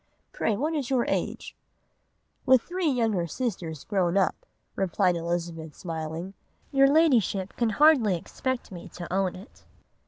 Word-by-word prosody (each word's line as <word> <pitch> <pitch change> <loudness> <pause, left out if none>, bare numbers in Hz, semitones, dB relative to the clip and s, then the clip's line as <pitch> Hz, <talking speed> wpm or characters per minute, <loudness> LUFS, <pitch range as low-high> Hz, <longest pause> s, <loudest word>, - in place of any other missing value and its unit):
Pray 215 - -1
what 305 +7 -1
is 285 -4 -2
your 255 -3 +2
age?' - - -3 0.9
"'With 260 -2 +6
three 360 -2 -1
younger 225 -9 +1
sisters 170 - -4
grown 190 -3 0
up,' 190 - 0 0.3
replied 185 -1 +1
Elizabeth, 170 -2 -4
smiling, 165 +2 -5 0.4
'your 275 -1 +5
Ladyship 240 - +2
can 235 -2 +1
hardly 250 - +4
expect 255 +8 -4
me 175 -2 -9
to 175 0 -7
own 190 -1 0
it. 190 +5 -14
195 Hz, 135 wpm, -27 LUFS, 175-260 Hz, 0.9 s, With